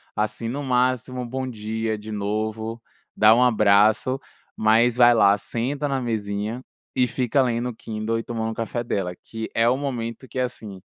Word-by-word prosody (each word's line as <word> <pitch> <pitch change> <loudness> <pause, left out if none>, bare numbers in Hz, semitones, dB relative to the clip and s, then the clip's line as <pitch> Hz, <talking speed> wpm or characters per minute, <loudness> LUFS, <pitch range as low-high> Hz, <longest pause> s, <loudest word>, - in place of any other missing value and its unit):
assim, 110 +2 -2
no 140 +5 -3
máximo 125 0 0
um 125 - -5
bom 130 +2 -3
dia 110 0 -3
de 110 +1 -9
novo, 110 +2 -3 0.3
dá 110 +1 +6
um 125 - +4
abraço, 110 +2 +4 0.4
mas 115 +2 +3
vai 120 -1 +7
lá, 100 -3 +5
senta 135 +8 -3
na 135 -1 0
mesinha 110 0 -3 0.3
e 125 -1 +3
fica 125 +1 +1
lendo 120 -1 0
o 120 - -8
Kindle 110 +1 -3
e 115 - -5
tomando 115 -1 -3
o - - -4
café 115 +1 -3
dela, 95 -5 -2
que 110 -1 -6
é 115 +1 +3
o 125 - +4
momento 130 -2 -4
que, 130 - -4
assim, 110 -6 -4
115 Hz, 180 wpm, -23 LUFS, 110-125 Hz, 0.4 s, vai